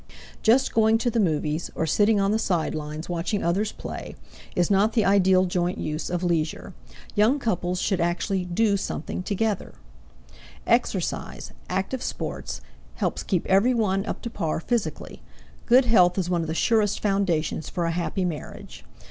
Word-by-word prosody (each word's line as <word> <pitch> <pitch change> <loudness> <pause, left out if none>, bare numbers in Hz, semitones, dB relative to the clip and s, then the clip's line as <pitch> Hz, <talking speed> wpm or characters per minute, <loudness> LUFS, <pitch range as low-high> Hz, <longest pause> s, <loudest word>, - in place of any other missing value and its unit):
Just 255 +4 +3
going 220 0 +4
to 240 +1 0
the 230 - 0
movies, 155 -3 0
or 160 - 0
sitting 205 +6 +3
on 195 0 +2
the 220 - +1
sidelines 155 -4 -2
watching 175 +4 -2
others 195 +5 0
play, - - -7 0.4
is 175 +2 +1
not 205 +3 +3
the 220 - +2
ideal 190 -1 +4
joint 175 0 -1
use 155 +1 -3
of 175 0 -2
leisure; 165 -3 -1 0.4
young 220 +7 +3
couples 180 -8 -1
should 190 -3 0
actually 180 +2 0
do 200 +4 +1
something 185 -1 -4
together. 200 - -2 0.9
Exercise - - -1 0.2
active 215 +7 -2
sports - - -4 0.3
helps - - -1
keep 180 -4 -1
every 210 +7 +3
one 195 -4 +1
up - - -4
to 235 - -3
par 160 -8 -2
physically; 230 +5 -3 0.5
good 250 +2 +6
health 180 -6 +4
is 180 -2 -1
one 175 -1 +1
of 165 - -3
the 160 - -3
surest 215 +1 +2
foundations 185 -7 0
for 175 - -2
a 165 - 0
happy 180 +2 -1
marriage. 155 - -7
190 Hz, 160 wpm, -25 LUFS, 170-215 Hz, 0.9 s, good